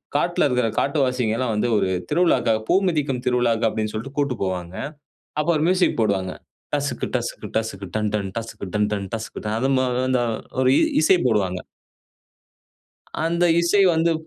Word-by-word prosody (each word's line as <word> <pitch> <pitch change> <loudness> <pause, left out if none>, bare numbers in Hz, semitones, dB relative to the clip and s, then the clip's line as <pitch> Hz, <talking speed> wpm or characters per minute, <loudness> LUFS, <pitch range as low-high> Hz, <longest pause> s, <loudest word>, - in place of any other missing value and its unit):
காட்ல 170 +2 +2
இருக்ற 125 -2 +1
காட்டுவாசிங்கல்லாம் 125 -4 0
வந்து 115 +3 0
ஒரு 95 - +1 0.2
திருவிழாக்காக 150 -9 +2
பூ - - +4
மிதிக்கும் 140 -6 -1
திருவிழாக்கு 120 -2 +2
அப்டின்னு 110 -1 -3
சொல்ட்டு 135 +6 -6
கூட்டு 140 -4 0
போவாங்க. 90 -2 -3 0.6
அப்போ 155 +3 0
ஒரு 150 - 0
மியூசிக் 185 -9 +2
போடுவாங்க. 95 -4 0 0.4
டசுக்கு, 145 0 -2
டசுக்கு, 120 -2 -5
டசுக்கு, 100 -3 -3
done 105 -1 0
done 100 -2 -2
டசுக்கு, 115 -3 -6
done 105 0 +2
done 100 -2 -3
done 110 -1 -4
அது 135 +3 +1
மொ 130 - +2 0.2
அந்த 130 -1 +2 0.4
ஒரு 130 - +4
இ - - +3 0.2
இசை 180 +4 +5
போடுவாங்க. 95 -6 +1 1.7
அந்த 170 +1 +1 0.2
இசை 170 +4 +3
வந்து 165 +1 +2
120 Hz, 150 wpm, -22 LUFS, 105-145 Hz, 1.7 s, இசை